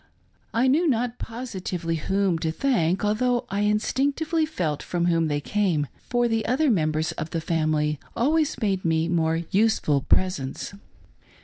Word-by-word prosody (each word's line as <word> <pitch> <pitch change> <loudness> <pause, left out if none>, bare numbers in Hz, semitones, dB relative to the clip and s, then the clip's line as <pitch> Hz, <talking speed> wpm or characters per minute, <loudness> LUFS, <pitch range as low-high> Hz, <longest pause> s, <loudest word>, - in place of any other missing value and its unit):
I 230 +3 +2
knew 315 +7 +3
not 245 -2 0
positively 190 -8 -4
whom 190 +1 0
to 160 0 -1
thank, 190 - +1
although 245 +4 +1
I 200 - -1
instinctively 280 +10 +1
felt 160 - -2
from 175 -1 -1
whom 165 -2 +2
they 145 -1 0
came, 175 -3 0 0.2
for 240 -1 +2
the 225 -1 0
other 270 +3 +2
members 155 -4 +1
of 155 - -5
the 165 - -2
family 155 -2 0 0.2
always 305 +4 +1
made 195 -3 0
me 160 0 +1
more 165 -1 +1
useful 195 -9 +2
presents. 145 -2 -1
190 Hz, 145 wpm, -25 LUFS, 160-240 Hz, 0.2 s, knew